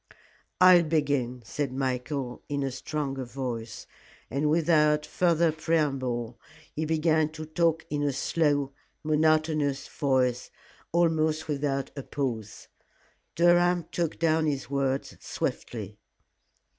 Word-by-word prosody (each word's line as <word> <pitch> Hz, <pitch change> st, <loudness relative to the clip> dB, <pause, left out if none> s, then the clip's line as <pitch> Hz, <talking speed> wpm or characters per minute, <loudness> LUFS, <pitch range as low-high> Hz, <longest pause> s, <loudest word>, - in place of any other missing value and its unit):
"I'll 185 Hz, -1 st, +8 dB
begin," 145 Hz, -6 st, 0 dB
said 140 Hz, +3 st, -3 dB
Michael, 130 Hz, 0 st, -3 dB
in 140 Hz, -1 st, -1 dB
a 135 Hz, -, -2 dB
stronger 135 Hz, 0 st, -3 dB
voice, 120 Hz, -3 st, -5 dB, 0.5 s
and 140 Hz, +4 st, +1 dB
without 150 Hz, -2 st, +3 dB
further 170 Hz, 0 st, +2 dB
preamble 135 Hz, -7 st, -1 dB, 0.3 s
he 155 Hz, -, -2 dB
began 160 Hz, 0 st, +2 dB
to 155 Hz, 0 st, -7 dB
talk 160 Hz, +1 st, +1 dB
in 145 Hz, -1 st, -1 dB
a 145 Hz, -1 st, +1 dB
slow, 145 Hz, 0 st, 0 dB, 0.3 s
monotonous 155 Hz, -2 st, +1 dB
voice, 130 Hz, -4 st, 0 dB, 0.4 s
almost 160 Hz, -2 st, +1 dB
without 140 Hz, -2 st, -2 dB
a 140 Hz, -, -4 dB
pause. 120 Hz, -7 st, -4 dB, 0.7 s
Durham 175 Hz, 0 st, +4 dB
took 170 Hz, -2 st, -2 dB
down 160 Hz, -1 st, +2 dB
his 135 Hz, -3 st, -3 dB
words 135 Hz, -1 st, -1 dB
swiftly. -, -, -5 dB
150 Hz, 110 wpm, -27 LUFS, 135-160 Hz, 0.7 s, I'll